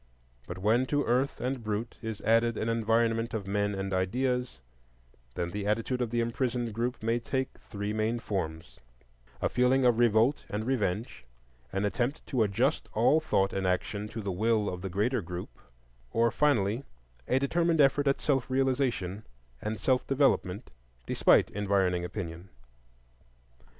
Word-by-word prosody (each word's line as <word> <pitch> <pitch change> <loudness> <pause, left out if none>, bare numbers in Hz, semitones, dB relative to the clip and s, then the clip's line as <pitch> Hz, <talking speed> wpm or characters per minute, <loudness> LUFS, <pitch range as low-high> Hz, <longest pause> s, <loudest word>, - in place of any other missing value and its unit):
But 85 - -6
when 110 +7 +2
to 145 +1 +1
earth 130 +4 +1
and 130 -1 -2
brute 110 +2 -3
is 110 -2 -5
added 115 +1 +3
an 110 - -1
environment 115 0 +1
of 105 -3 -3
men 100 +1 0
and 95 0 -3
ideas, 125 - -1 0.8
then 85 0 -2
the 100 +2 -3
attitude 115 +4 0
of 120 - 0
the 120 +1 0
imprisoned 120 -1 -1
group 120 +2 -2
may 115 +1 +1
take 130 +2 -3
three 105 -1 -5
main 110 +2 0
forms,—a 60 - -6
feeling 125 +1 +3
of 120 -2 +4
revolt 120 +4 +3
and 105 +2 -3
revenge; 110 - -1 0.5
an 100 +1 -1
attempt 120 +7 -1
to 130 -4 0
adjust 115 +8 +1
all 120 +8 +4
thought 100 -11 +1
and 95 -1 -1
action 100 +3 -1
to 110 +1 -6
the 100 - -2
will 110 +2 +1
of 90 -1 -5
the 95 - -4
greater 110 +7 0
group; 90 0 -6 0.6
or, 115 0 +2
finally, 120 -4 +2 0.4
a 130 - +2
determined 165 +4 +1
effort 145 0 +4
at 135 - +2
self 135 -4 0
realization 130 -7 0 0.4
and 110 +1 -3
self 130 -1 +1
development 130 - +1 0.3
despite - - +4
environing 95 -3 +1
opinion. 90 -1 -6
115 Hz, 150 wpm, -29 LUFS, 100-125 Hz, 0.8 s, of